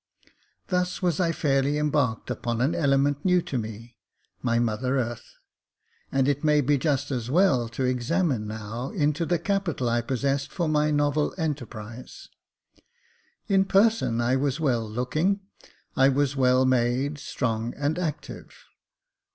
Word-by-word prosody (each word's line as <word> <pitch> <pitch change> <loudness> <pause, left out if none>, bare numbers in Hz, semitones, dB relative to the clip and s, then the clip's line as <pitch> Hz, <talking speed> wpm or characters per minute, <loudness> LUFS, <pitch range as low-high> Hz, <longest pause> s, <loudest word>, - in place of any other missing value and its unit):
Thus 180 0 -1
was 175 -4 +1
I 170 -2 +2
fairly 140 -2 +1
embarked 145 -7 0
upon 120 -1 -2
an 135 +6 +1
element 140 -1 +1
new 180 -1 +4
to - - -6
me 115 +2 -8 0.2
— - - -44
my 115 -1 +1
mother 120 +3 0
earth; 120 -2 -4 0.8
and 135 -1 +2
it 145 +1 0
may 150 -1 +4
be 145 +1 +2
just 145 -1 0
as 120 -3 -3
well 135 -7 +3
to 120 +3 -4
examine 125 - 0
now 110 +4 -5
into 150 +2 0
the 175 - +2
capital 170 -7 -1
I 120 0 +1
possessed 135 +3 -1
for 170 -3 -1
my 150 0 +2
novel 145 0 +1
enterprise. 125 - -6 1.2
In 195 -1 +4
person 195 - +2
I 120 +2 +2
was 140 +2 -1
well 120 -8 0
looking; 155 - 0 0.5
I 135 +1 +5
was 140 0 +1
well 130 -1 +3
made, 130 +3 +1
strong, 115 -4 -2
and 145 +4 -1
active. 155 -5 -5
140 Hz, 145 wpm, -26 LUFS, 120-155 Hz, 1.2 s, I